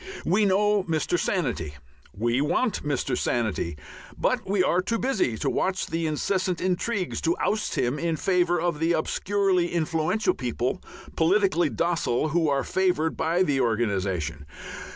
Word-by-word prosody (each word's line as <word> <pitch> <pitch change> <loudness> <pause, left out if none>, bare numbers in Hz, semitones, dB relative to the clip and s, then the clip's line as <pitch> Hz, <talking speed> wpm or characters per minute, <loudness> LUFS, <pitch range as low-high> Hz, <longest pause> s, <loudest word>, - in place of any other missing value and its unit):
We 205 +5 +3
know 205 +1 +3
Mr. 165 0 0
Sanity, 125 - -2 0.4
we 120 +5 0
want 205 - 0
Mr. 145 -3 -1
Sanity, 110 -9 -1 0.4
but - - 0
we 195 -2 +3
are 180 0 +2
too 230 +5 -1
busy 215 - 0
to - - -2
watch 190 0 0
the 165 0 -2
incessant 185 +4 -1
intrigues 185 +1 -1
to 165 +1 +1
oust 210 0 -1
him 125 +4 0
in 165 +1 0
favour 175 -1 +2
of 170 -3 -1
the 165 +2 +2
obscurely 185 +2 +1
influential 165 +5 0
people, 125 +5 -2 0.3
politically 175 -1 +3
docile, 155 +1 0
who 160 0 +1
are 140 -1 +1
favoured 180 -4 0
by 170 +3 +1
the 140 -6 +1
organization. 95 - -1
165 Hz, 145 wpm, -25 LUFS, 130-185 Hz, 0.4 s, We